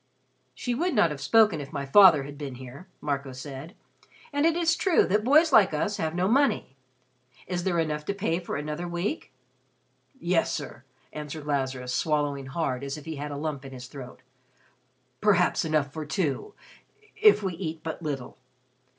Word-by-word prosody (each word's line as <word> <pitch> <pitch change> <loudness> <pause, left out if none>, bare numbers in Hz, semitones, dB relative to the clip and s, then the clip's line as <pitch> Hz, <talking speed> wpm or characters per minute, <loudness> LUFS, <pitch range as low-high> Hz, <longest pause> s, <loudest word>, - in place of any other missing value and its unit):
"She 245 - -2
would 335 +5 0
not 175 -7 +4
have 140 -2 -6
spoken 210 -1 +4
if 140 0 -9
my 140 - -4
father 160 -1 +7
had 145 +1 -8
been 140 -3 -6
here," 130 +7 -11
Marco 140 -2 -3
said. 140 - -8 0.6
"And 285 +3 +3
it 330 - +2
is 335 -1 +2
true 370 -2 +3
that 210 +3 +1
boys 305 +5 +5
like 195 -8 +6
us 205 +7 -1
have 160 -4 -2
no 180 +1 +1
money. 260 - +2 0.7
Is 175 -1 -3
there 180 -3 +1
enough 155 -2 -1
to 200 - -2
pay 185 -4 -1
for 175 - -5
another 150 +4 -4
week?" 175 - -3 0.9
"Yes, 175 -4 +1
sir," 130 -5 -6 0.3
answered 150 0 -6
Lazarus, 130 -3 -2
swallowing 145 -3 0
hard 135 -2 -2
as 140 +2 -4
if 150 - -11
he 160 -2 -5
had 145 +1 -4
a 145 - -5
lump 145 -2 -4
in 135 -1 -9
his 125 -1 -8
throat, 130 -1 -11 1.0
"perhaps 190 -4 +3
enough 155 -3 0
for 155 - -4
two 160 - -2 0.6
if 425 - +5
we 190 -2 -1
eat 165 -2 -5
but 160 +1 -5
little. 140 -5 -5
155 Hz, 175 wpm, -27 LUFS, 140-195 Hz, 1.0 s, father